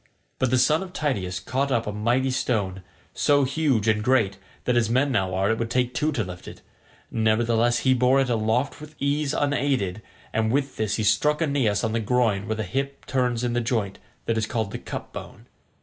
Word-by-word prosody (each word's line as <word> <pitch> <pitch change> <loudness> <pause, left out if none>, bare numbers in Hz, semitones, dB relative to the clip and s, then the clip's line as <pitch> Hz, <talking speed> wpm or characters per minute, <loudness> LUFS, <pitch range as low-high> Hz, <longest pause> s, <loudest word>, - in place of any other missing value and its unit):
But 130 - +2
the 130 - +3
son 150 +7 +3
of 185 -1 -7
Tydeus 95 - -2
caught 130 +8 -1
up 115 -3 +1
a 105 - -2
mighty 120 +6 +1
stone, 100 -7 -1 0.3
so 145 -1 +3
huge 135 -5 +1
and 105 -1 +2
great 110 -6 +2 0.3
that 125 - +2
as 115 -2 +2
men 130 +4 +2
now 95 -7 0
are 95 +3 +2
it 110 - -1
would 115 -1 -2
take 125 0 0
two 155 +1 0
to 115 - 0
lift 90 -1 -9
it; - - -10 0.5
nevertheless 115 +2 +2
he 130 - +5
bore 130 +2 +3
it 135 - +2
aloft 120 +5 0
with 150 0 -11
ease 140 0 0
unaided, 135 -10 0 0.3
and 110 0 +1
with 135 +1 -1
this 110 -1 0
he 110 - -1
struck 150 +8 +2
Aeneas 140 -10 +1
on 110 - 0
the 115 - 0
groin 110 -3 +1
where 110 - -1
the 110 - -2
hip 135 +8 -4
turns 125 -3 0
in 120 -1 0
the 120 - +1
joint 110 -5 -2 0.3
that 115 -1 0
is 110 - -1
called 110 -4 -2
the - - -5
"cup - - -7
bone." - - -9
120 Hz, 210 wpm, -25 LUFS, 110-135 Hz, 0.5 s, he